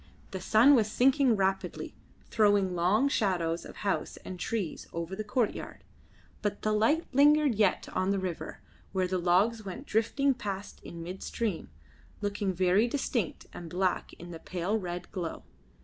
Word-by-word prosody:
The 190 - -5
sun 225 +9 +6
was 220 -5 +3
sinking 265 0 +4
rapidly, 195 -1 -1 0.3
throwing 205 -4 +3
long 185 +10 +3
shadows 175 -10 0
of - - -10
house 195 - -1
and 185 -1 -7
trees 205 -7 -3
over 170 +2 -4
the 215 - -4
courtyard, 230 +1 -2 0.6
but 205 -1 -3
the 215 - +1
light 230 +11 +2
lingered 295 0 +5
yet 205 -3 +1
on 185 +1 0
the 200 - +2
river, 185 -3 -5 0.3
where 190 -1 +1
the 185 0 -1
logs 195 +6 +2
went 190 -3 -7
drifting 270 +6 +1
past 200 -5 -6
in 170 -1 -8
midstream, 190 +2 -4 0.5
looking 205 -1 -1
very 185 +5 +3
distinct 240 - -2
and 170 -1 -8
black 185 +1 -1
in 175 +1 -10
the 165 - -8
pale 180 +5 -2
red 175 -2 -6
glow. 175 -4 -5
200 Hz, 155 wpm, -29 LUFS, 180-225 Hz, 0.6 s, sun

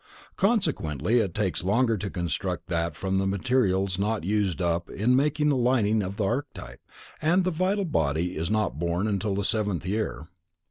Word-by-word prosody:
Consequently 130 - +1
it 100 -7 -1
takes 100 -5 -1
longer 115 +5 +2
to 100 0 -4
construct 85 -5 -3
that 85 -2 -1
from 95 +3 -1
the 95 - 0
materials 95 -3 +1
not 105 -1 0
used 100 -1 0
up 85 -1 -1
in 120 +5 +1
making 150 +2 +2
the 145 - +3
lining 120 -4 +2
of 95 +1 -5
the 105 - 0
archetype, 100 - -4 0.4
and 175 +4 +3
the 185 - 0
vital 190 +4 0
body 80 - 0
is 80 +2 -2
not 105 - 0
born 85 +3 0
until 100 -1 -1
the 100 - -1
seventh 105 -5 0
year. 95 - -2
100 Hz, 175 wpm, -26 LUFS, 90-125 Hz, 0.4 s, the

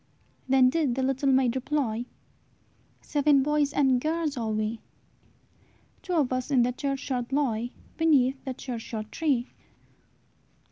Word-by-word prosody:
Then 260 -1 +5
did 290 -6 0
the 265 - -1
little 270 +1 +1
maid 260 -2 +3
reply, 255 -4 -1 0.9
"Seven 290 -2 +3
boys 295 0 +1
and 265 -4 +2
girls 315 -1 -1
are 230 -3 -2
we; 215 +1 -2 1.2
Two 365 - -4
of 285 -7 +2
us 255 +1 -2
in 260 -4 +4
the 245 - +1
churchyard 265 -2 -3
lie, 245 -5 0 0.3
Beneath 275 -5 +3
the 260 -2 -5
churchyard 225 -4 -6
tree." 270 -6 0
265 Hz, 130 wpm, -27 LUFS, 245-290 Hz, 1.2 s, Then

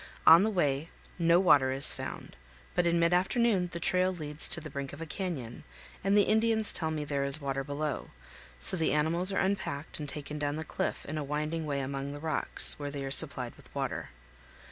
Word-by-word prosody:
On 165 +2 +9
the 215 - +1
way 155 -5 -1 0.3
no 170 +1 +4
water 145 -8 +4
is 135 +1 +3
found, - - -8 0.4
but 175 - +1
in 170 0 +1
mid 170 +1 +2
afternoon 190 0 +1
the 170 - -5
trail 185 +2 +1
leads 150 -4 -6
to 175 - +6
the 155 -1 -10
brink 140 -1 -6
of 145 - -10
a 165 - -5
canyon, 155 - -6 0.4
and 195 +2 +2
the 205 - +5
Indians 220 +1 +1
tell 160 -3 +1
me 155 -1 -4
there 140 -1 -2
is 140 +2 +6
water 135 -1 -3
below; 145 +1 -4 0.5
so - - +6
the 165 -4 0
animals 165 +5 +1
are - - -3
unpacked 190 -8 -3
and 150 -1 -6
taken 150 +1 -7
down 145 0 -2
the 160 - -5
cliff - - -4
in 155 +1 -5
a - - -3
winding 150 +2 -3
way 140 -1 -2
among 135 +1 -5
the 145 - -8
rocks, 155 -1 +3
where 145 -1 -4
they 140 -1 -6
are 135 - -5
supplied 135 -5 +5
with - - -19
water. - - -4
155 Hz, 210 wpm, -29 LUFS, 140-175 Hz, 0.5 s, On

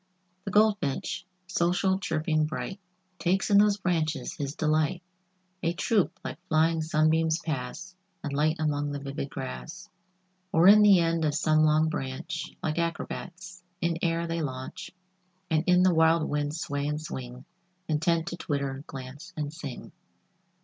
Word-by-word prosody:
The 200 - -3
Goldfinch, 205 -6 +1 0.2
social, 185 +1 +1
chirping, 155 -3 0
bright, 190 +5 -5 0.4
Takes 190 +4 +1
in 200 - +7
those 205 -1 +4
branches 160 -8 -1
his 140 0 -4
delight. 155 +2 +1 0.6
A 170 0 0
troop 200 +2 +1
like 175 - -7
flying 160 0 +3
sunbeams 160 +1 +2
pass 160 +3 -5 0.3
And 145 -3 -3
light 155 +3 +2
among 145 -2 -1
the 145 - -3
vivid 140 0 -5
grass, 65 - -7 0.6
Or 165 +3 +5
in 210 +2 +9
the 205 -2 +7
end 165 -1 +1
of 150 -1 +1
some 155 0 +3
long 155 +1 +4
branch, 135 -5 -4
Like 155 +1 -1
acrobats, 175 +1 -4 0.2
in 170 -1 0
air 170 0 0
they 165 0 -2
launch, 140 +6 -5 0.6
And 155 0 +3
in 180 0 +5
the 185 -1 +5
wild 160 0 +4
wind 145 0 -1
sway 145 -3 -2
and 150 0 -1
swing, 130 -4 -7 0.4
Intent 165 +1 +1
to 175 - -6
twitter, 140 -4 -3
glance 140 +6 -9
and 150 -1 -3
sing. 145 -6 -8
160 Hz, 150 wpm, -28 LUFS, 145-175 Hz, 0.6 s, in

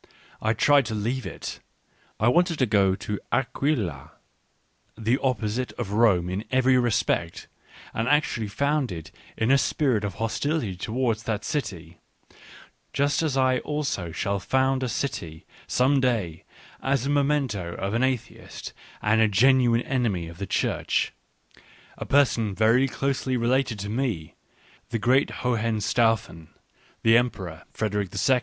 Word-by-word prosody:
I 110 +1 +2
tried 140 +4 +4
to 110 - -3
leave 120 +5 -2
it. - - -7 0.6
I 110 - +2
wanted 175 +6 +3
to 130 - +3
go 100 -4 +3
to 105 +1 -4
Aquila 120 - -1 0.4
— - - -42
the 125 +4 +3
opposite 125 -1 -1
of 110 -5 -5
Rome 100 -5 +3
in 95 +4 -3
every 130 0 +3
respect, 105 -8 0 0.5
and 115 +1 -1
actually 145 -7 +1
founded 125 - -1 0.3
in 110 +3 +2
a 140 - +5
spirit 125 -4 +1
of 100 -3 -3
hostility 115 - -1
towards 110 +3 -1
that 105 -2 -2
city, 85 - -4 0.9
just 145 +2 +1
as 150 -4 0
I 130 -1 +3
also 145 - -3
shall 100 +4 -1
found 130 +5 +1
a 130 - -1
city 85 - -4 0.2
some 135 +2 +3
day, 110 -11 -1 0.4
as 135 -1 0
a - - -1
memento 135 -12 0
of 100 +2 -3
an 115 - +1
atheist 130 -3 -3 0.3
and 110 0 +3
genuine 125 +2 +4
enemy 115 -11 -1
of 85 +2 -11
the 100 - -4
Church, - - 0 0.8
a - - -7
person 115 -7 +2
very 115 +5 +4
closely 135 -1 -1
related 125 0 +1
to 100 0 -5
me, 110 -9 -2 0.6
the 115 - -1
great 125 +5 +3
Hohenstaufen, 115 -6 0 0.6
the 115 0 +6
Emperor 95 -9 -2
Frederick 105 -3 -2 0.2
II. 130 -2 +5
115 Hz, 140 wpm, -25 LUFS, 105-130 Hz, 0.9 s, the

